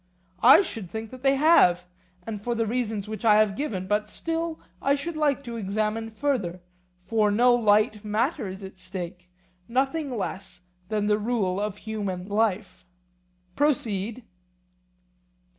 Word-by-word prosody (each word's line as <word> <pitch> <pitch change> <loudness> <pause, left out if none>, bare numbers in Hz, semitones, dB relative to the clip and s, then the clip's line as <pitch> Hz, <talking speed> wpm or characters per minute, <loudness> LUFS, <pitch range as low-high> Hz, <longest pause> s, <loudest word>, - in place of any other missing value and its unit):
I 265 +11 +8
think 220 - -6
that 255 -1 -10
they 270 0 +3
have, 265 - +5 0.4
and 210 -3 -5
for 240 +2 -2
the 230 0 0
reasons 220 -3 -2
which 215 +2 -6
I 215 -2 +6
have 210 -2 +3
given; 205 -10 -3
but 210 +2 0
still 330 +4 -3 0.2
I 280 +1 +3
should 320 +4 -5
like 290 -3 +1
to 235 -3 -6
examine 215 +2 -2
further, 220 -7 -2 0.4
for 210 +4 +1
no 240 +4 +4
light 215 -2 +3
matter 220 +4 -1
is 190 +1 -8
at 190 -1 -10
stake, 185 -1 -7 0.4
nothing 270 +2 -1
less 190 -2 -5 0.3
than 210 -1 0
the 210 0 +2
rule 205 -4 0
of 210 -1 -3
human 200 -4 -4
life. 205 -2 -1 0.7
Proceed. 240 -6 0
215 Hz, 140 wpm, -26 LUFS, 200-250 Hz, 0.7 s, I